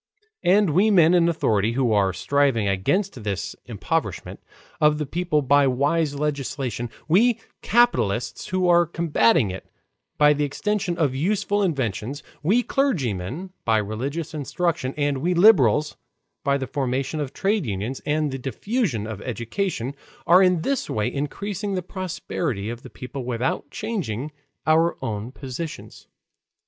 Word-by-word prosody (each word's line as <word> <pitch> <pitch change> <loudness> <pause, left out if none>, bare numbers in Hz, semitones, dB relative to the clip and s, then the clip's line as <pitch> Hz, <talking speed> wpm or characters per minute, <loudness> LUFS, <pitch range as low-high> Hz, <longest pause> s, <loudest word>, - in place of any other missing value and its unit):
And 190 0 +4
we 190 +8 +4
men 175 -4 +5
in 170 -1 +4
authority 110 -9 +1
who 125 -3 +1
are 100 -2 +3
striving 135 +1 +1
against 125 - 0
this 100 -3 -3
impoverishment - - -3 0.4
of 150 0 +4
the 150 - -2
people 160 0 0
by 140 +1 +4
wise 145 +4 +1
legislation, 140 -4 -3 0.2
we 225 +8 +4 0.2
capitalists 125 - +1
who 185 -1 0
are 175 -1 +5
combating 145 - +2
it 95 - -9 0.5
by 150 0 +6
the 150 0 -1
extension 180 +4 -1
of 145 -6 +1
useful 205 +7 0
inventions, 135 - -2 0.2
we 210 +11 +3
clergymen 155 - -1
by 110 -1 +3
religious 135 +10 -3
instruction, 155 -1 -2
and 145 -2 0
we 175 +5 0
liberals 155 - +5 0.5
by 140 0 +2
the 135 - -3
formation 135 +2 -2
of 140 -3 -3
trades 195 - 0
unions, 105 +6 -3
and 150 -1 0
the 135 - -4
diffusion 140 - -2
of 110 -2 -6
education, 125 - -3 0.3
are 180 +3 +6
in 180 -3 +3
this 275 -2 -1
way 105 -1 -1
increasing 200 +8 -3
the 185 - -2
prosperity 160 - -3
of 120 0 -8
the - - -11
people 130 +1 -7
without 125 +3 -2
changing 150 - -4 0.3
our 160 +2 +3
own 110 +2 -4
positions. 140 +4 -7
145 Hz, 140 wpm, -23 LUFS, 125-180 Hz, 0.5 s, by